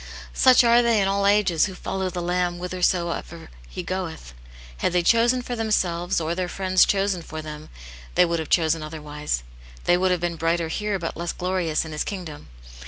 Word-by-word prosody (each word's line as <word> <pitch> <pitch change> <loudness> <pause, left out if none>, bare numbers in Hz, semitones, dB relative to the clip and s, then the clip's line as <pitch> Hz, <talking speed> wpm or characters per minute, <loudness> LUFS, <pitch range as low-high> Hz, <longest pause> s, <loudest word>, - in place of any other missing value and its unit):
" - - -15
Such 255 - +6
are 235 0 +5
they 235 -2 +3
in 195 - +2
all 200 0 +1
ages 200 -6 +3
who 190 - -8
follow 190 0 -3
the 175 -1 -4
Lamb 175 0 0
whithersoever 175 -2 -2 0.2
He - - -6
goeth. 170 - -5 0.4
Had 65 - 0
they 180 -1 +2
chosen 235 +5 +3
for 245 - -4
them 225 -1 -2
selves, 175 -3 0
or 165 +1 -2
their 180 0 -2
friends 185 -1 +3
chosen 195 -2 0
for 155 -1 -8
them, 155 0 -9 0.5
they 180 - +6
would 170 -1 -1
have 160 - -5
chosen 160 -1 +2
otherwise. 150 - -4 0.4
They 175 - +3
would 185 +1 +2
have 180 -1 +1
been 170 -1 -2
brighter 165 0 0
here, 210 +3 -1
but 170 -3 -4
less 170 0 -3
glorious 180 -4 -1
in 160 - -8
His 150 - -2
kingdom. 175 -7 -7
175 Hz, 200 wpm, -24 LUFS, 165-195 Hz, 0.5 s, Such